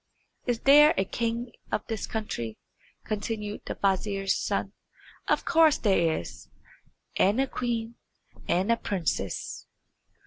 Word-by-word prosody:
"Is 240 Hz, -2 st, 0 dB
there 295 Hz, +2 st, +7 dB
a 190 Hz, -, +2 dB
king 235 Hz, +3 st, -2 dB, 0.2 s
of -, -, -1 dB
this 225 Hz, -3 st, -4 dB
country?" 120 Hz, -, -4 dB, 0.5 s
continued 210 Hz, 0 st, -4 dB
the -, -, -3 dB
vizier's 195 Hz, 0 st, 0 dB
son. -, -, -2 dB, 0.5 s
"Of -, -, +1 dB
course 320 Hz, -3 st, +5 dB
there 170 Hz, -6 st, +2 dB
is, -, -, -10 dB, 0.7 s
and 205 Hz, +6 st, +3 dB
a 270 Hz, -, +3 dB
queen, 235 Hz, -3 st, -3 dB, 0.5 s
and 190 Hz, +6 st, +2 dB
a 230 Hz, -, +3 dB
princess." 185 Hz, -8 st, -3 dB
215 Hz, 125 wpm, -27 LUFS, 195-235 Hz, 0.7 s, there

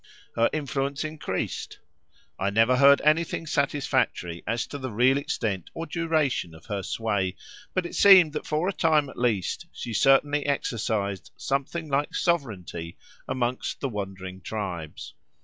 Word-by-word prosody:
Her 115 Hz, 0 st, +3 dB
influence 140 Hz, -1 st, -2 dB
increased. 155 Hz, -11 st, -4 dB, 0.6 s
I 95 Hz, -, +1 dB
never 115 Hz, +5 st, +3 dB
heard 140 Hz, +1 st, +7 dB
anything 165 Hz, +2 st, +1 dB
satisfactory 130 Hz, -, 0 dB
as 115 Hz, 0 st, 0 dB
to 145 Hz, -, -7 dB
the 130 Hz, -1 st, -4 dB
real 125 Hz, +5 st, +3 dB
extent 110 Hz, -, -2 dB
or 165 Hz, -, -4 dB
duration 155 Hz, -, 0 dB
of 80 Hz, -, -15 dB
her 100 Hz, -3 st, -3 dB
sway, 95 Hz, -2 st, -1 dB, 0.4 s
but 185 Hz, -2 st, +1 dB
it -, -, -6 dB
seemed 185 Hz, -6 st, +7 dB
that 150 Hz, -, -4 dB
for 155 Hz, +4 st, 0 dB
a 200 Hz, -, 0 dB
time 155 Hz, -5 st, +2 dB
at -, -, -10 dB
least 120 Hz, -, 0 dB
she 120 Hz, -, -6 dB
certainly 145 Hz, +5 st, +4 dB
exercised 110 Hz, -8 st, -1 dB
something 140 Hz, +4 st, -2 dB
like 145 Hz, +1 st, -1 dB
sovereignty 100 Hz, -, -2 dB, 0.3 s
amongst 125 Hz, 0 st, -2 dB
the 135 Hz, -, -2 dB
wandering 95 Hz, -3 st, -6 dB
tribes. 90 Hz, -8 st, -5 dB
130 Hz, 145 wpm, -26 LUFS, 100-150 Hz, 0.6 s, heard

